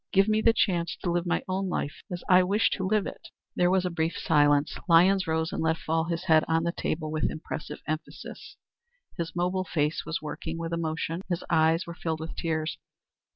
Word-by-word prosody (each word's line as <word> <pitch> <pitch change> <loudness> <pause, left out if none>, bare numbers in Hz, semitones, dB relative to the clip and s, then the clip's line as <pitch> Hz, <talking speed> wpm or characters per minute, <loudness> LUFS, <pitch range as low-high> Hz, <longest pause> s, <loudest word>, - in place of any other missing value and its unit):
Give 195 +1 +4
me 215 0 +2
the 230 - +5
chance 175 -7 0
to 175 - 0
live 175 +1 0
my 175 - 0
own 190 0 -1
life 145 -4 -3
as 175 -1 -5
I 185 -1 +7
wish 200 +5 +2
to 190 -2 -1
live 210 0 +2
it." - - -8 0.3
There 180 - +3
was 185 0 +2
a 180 - -1
brief 165 0 -1
silence. 145 -2 +3
Lyons 185 +3 +5
rose 160 0 0
and - - -2
let 160 0 +1
fall 160 0 -1
his 170 0 -3
hand 160 -4 +5
on 165 0 +2
the 170 - 0
table 155 -2 -3
with 155 - 0
impressive 155 -1 -6
emphasis. 155 +1 -6 0.6
His 165 0 -3
mobile 180 +2 0
face 155 -3 -1
was 165 - -3
working 160 +1 -5
with 165 0 -4
emotion; 165 +1 -2
his 175 -1 -1
eyes 160 +1 +3
were 170 - -7
filled 160 -2 -3
with 160 0 -6
tears. 160 -2 -2
165 Hz, 205 wpm, -27 LUFS, 160-180 Hz, 0.6 s, I